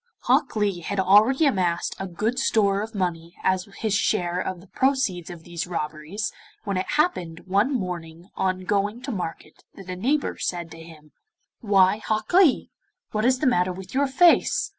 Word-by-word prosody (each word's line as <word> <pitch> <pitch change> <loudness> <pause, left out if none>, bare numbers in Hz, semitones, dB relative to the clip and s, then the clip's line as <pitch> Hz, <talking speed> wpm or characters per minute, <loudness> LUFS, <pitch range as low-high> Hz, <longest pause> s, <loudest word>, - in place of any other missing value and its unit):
Hok - - +2
Lee 205 -4 0
had 195 +4 -4
already 210 - +5
amassed 180 -10 0
a 195 - -4
good 215 +8 -2
store 200 -6 +2
of 220 +1 -7
money 170 -3 -3
as 185 0 +1 0.2
his 220 -3 0
share 180 -3 +1
of 185 -2 -4
the 180 - -15
proceeds 215 -8 0
of 170 -2 -10
these 175 +1 -5
robberies 155 +4 -4 0.3
when 200 -3 -2
it 185 - -2
happened 180 - 0
one 200 +8 +1
morning 175 - -5
on 185 0 -1
going 205 +4 -1
to 275 - -4
market 165 -6 -6
that 185 -2 -9
a - - -4
neighbour 270 +10 -1
said 170 -2 -3
to 165 - -11
him: 155 -2 -14 0.5
'Why, 195 -2 +4
Hok 215 +2 -3
Lee, 355 -7 +4 0.4
what 215 +1 -1
is 255 +1 +4
the 295 - -2
matter 185 -8 +2
with 185 +1 -9
your 280 +2 +2
face? 335 +6 +4
190 Hz, 180 wpm, -24 LUFS, 175-220 Hz, 0.5 s, already